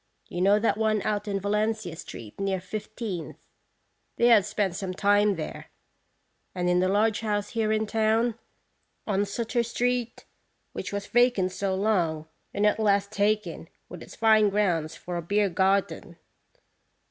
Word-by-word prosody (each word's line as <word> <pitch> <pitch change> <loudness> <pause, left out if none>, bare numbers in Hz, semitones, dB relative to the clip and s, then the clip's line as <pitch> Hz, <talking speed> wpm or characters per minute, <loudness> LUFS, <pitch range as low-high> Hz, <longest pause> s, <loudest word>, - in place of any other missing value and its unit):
You 175 - -4
know 200 +2 +5
that 215 0 0
one 215 -2 +1
out 210 0 -2
on 200 -1 -1
Valencia 210 -2 -1
street, 115 - -10
near 195 -1 -1
Fifteenth? 210 -1 -6 0.8
They 240 - +4
have 220 -5 +5
spent 195 -4 -1
some 185 -2 -4
time 205 +1 +3
there; 160 -3 -6 0.9
and 180 -1 -1
in 180 0 +3
the 185 - +2
large 205 +2 +2
house 205 -2 -2
here 225 -2 -1
in 220 0 +1
town, 220 +2 +1 0.7
on 200 -1 0
Sutter 235 +4 -1
street, 240 0 -2 0.5
which - - -5
was 200 0 -3
vacant 240 -6 +2
so 190 +1 -2
long, 175 -6 0 0.2
and 205 - 0
at 210 - +2
last 200 -1 +2
taken, 215 +1 -1 0.2
with - - -9
its - - -11
fine 220 -2 +4
grounds, 175 -6 0
for 175 -1 -6
a - - -2
beer 200 +4 +1
garden." 190 +2 0
205 Hz, 155 wpm, -26 LUFS, 190-220 Hz, 0.9 s, know